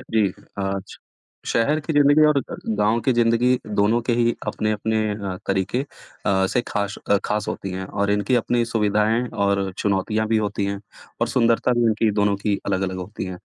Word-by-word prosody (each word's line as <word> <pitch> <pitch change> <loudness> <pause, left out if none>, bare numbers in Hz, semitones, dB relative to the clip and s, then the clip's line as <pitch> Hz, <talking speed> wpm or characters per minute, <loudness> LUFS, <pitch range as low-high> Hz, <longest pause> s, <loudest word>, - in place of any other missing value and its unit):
जी, 105 -4 +2 0.3
आज 95 0 -3 0.5
शहर 145 +7 +1
की 160 +2 -3
ज़िंदगी 145 +1 +5
और 150 -2 +4
अ, 135 - -6 0.2
गाँव 105 +3 +2
की 130 +3 +1
ज़िंदगी 120 +2 +3
दोनों 105 +2 +2
के 120 - 0
ही 120 0 +2
अपने-अपने 110 +1 -1
अ, 100 -3 -4
तरीके 95 +6 0 0.5
अ, 95 -1 +3
से 125 - +1
ख़ाश 100 -2 -2
अ, 100 - +6
ख़ास 105 0 -1
होती 95 - -4
हैं 95 +1 -4
और 100 +1 -1
इनकी 105 +5 +1
अपनी 120 -1 +1
सुविधाएँ 110 +1 +1
और 100 -1 0
चुनौतियाँ 105 +2 0
भी 110 - +2
होती 105 -1 -1
हैं, 100 0 -3 0.4
और - - +1
सुंदरता 115 0 +2
भी 120 - +3
इनकी 110 0 +2
दोनों 100 -1 +2
की 100 0 0
अलग-अलग 95 -1 -1
होती 95 +2 -6
हैं। 95 -1 -6
105 Hz, 180 wpm, -22 LUFS, 100-115 Hz, 0.5 s, अ